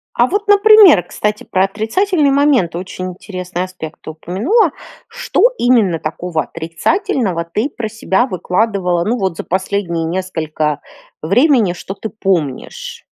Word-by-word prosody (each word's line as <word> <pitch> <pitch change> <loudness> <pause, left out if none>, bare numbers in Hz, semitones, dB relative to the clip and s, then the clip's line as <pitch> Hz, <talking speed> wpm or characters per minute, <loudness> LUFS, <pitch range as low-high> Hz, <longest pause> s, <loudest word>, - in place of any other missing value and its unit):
А 240 - +3
вот, 410 +7 -2
например, 410 - +7
кстати, 210 +4 -3
про 185 +1 +1
отрицательный 285 - 0
момент 275 - +2
очень 185 +1 -5
интересный 180 -1 -5
аспект 180 -4 -8
ты - - -9
упомянула. 240 - +1 0.4
Что - - -1
именно 220 -9 +2
такого 160 0 -3
отрицательного 180 - -2
ты 210 +11 -2
про 240 -5 -5
себя 220 +1 0
выкладывала, 185 -4 0
ну, 235 +3 0
вот 190 -6 -2
за - - -4
последние 185 -3 -2
несколько 160 -4 -2 0.4
времени, 225 - +3
что 185 +2 -7
ты 220 +2 -6
помнишь? 175 - -3
190 Hz, 130 wpm, -16 LUFS, 175-245 Hz, 0.4 s, например